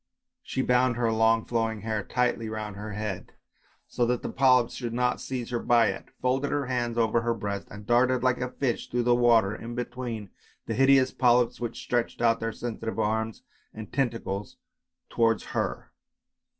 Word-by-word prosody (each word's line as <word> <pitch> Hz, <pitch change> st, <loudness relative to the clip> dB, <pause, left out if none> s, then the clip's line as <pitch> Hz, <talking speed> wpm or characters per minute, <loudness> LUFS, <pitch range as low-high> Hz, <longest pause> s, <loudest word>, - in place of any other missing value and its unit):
She 130 Hz, -, -2 dB
bound 125 Hz, -1 st, +3 dB
her 115 Hz, -1 st, +1 dB
long 110 Hz, 0 st, +3 dB
flowing 115 Hz, -2 st, -1 dB
hair 110 Hz, -2 st, -2 dB
tightly 125 Hz, -2 st, 0 dB
round 110 Hz, -2 st, -5 dB
her 105 Hz, +1 st, -6 dB
head, 100 Hz, -3 st, -5 dB, 0.5 s
so 120 Hz, -, -1 dB
that 125 Hz, 0 st, 0 dB
the -, -, -3 dB
polyps 125 Hz, -3 st, +4 dB
should 120 Hz, -2 st, -4 dB
not 125 Hz, 0 st, 0 dB
seize 125 Hz, -2 st, -4 dB
her 120 Hz, -, 0 dB
by 115 Hz, -2 st, +4 dB
it, -, -, -5 dB
folded 130 Hz, +3 st, 0 dB
her 145 Hz, -1 st, -1 dB
hands 120 Hz, -2 st, -2 dB
over 115 Hz, 0 st, +2 dB
her 115 Hz, 0 st, 0 dB
breast, 100 Hz, -2 st, -4 dB
and 105 Hz, 0 st, -10 dB
darted 125 Hz, +2 st, +3 dB
like 125 Hz, -1 st, +2 dB
a 125 Hz, -, -1 dB
fish 125 Hz, -2 st, -2 dB
through 120 Hz, 0 st, 0 dB
the 120 Hz, 0 st, +4 dB
water, 115 Hz, -4 st, +4 dB
in 120 Hz, +1 st, -7 dB
between 120 Hz, -4 st, -5 dB, 0.3 s
the -, -, -3 dB
hideous 135 Hz, -1 st, +4 dB
polyps 120 Hz, -1 st, +3 dB
which 120 Hz, -1 st, -5 dB
stretched 120 Hz, -1 st, -1 dB
out 115 Hz, -1 st, +3 dB
their 115 Hz, 0 st, -2 dB
sensitive 115 Hz, -2 st, -5 dB
arms 110 Hz, 0 st, -1 dB, 0.3 s
and 110 Hz, -2 st, -9 dB
tentacles 115 Hz, -6 st, -2 dB, 0.5 s
towards 115 Hz, -2 st, +2 dB
her. -, -, -2 dB
120 Hz, 175 wpm, -27 LUFS, 110-125 Hz, 0.5 s, polyps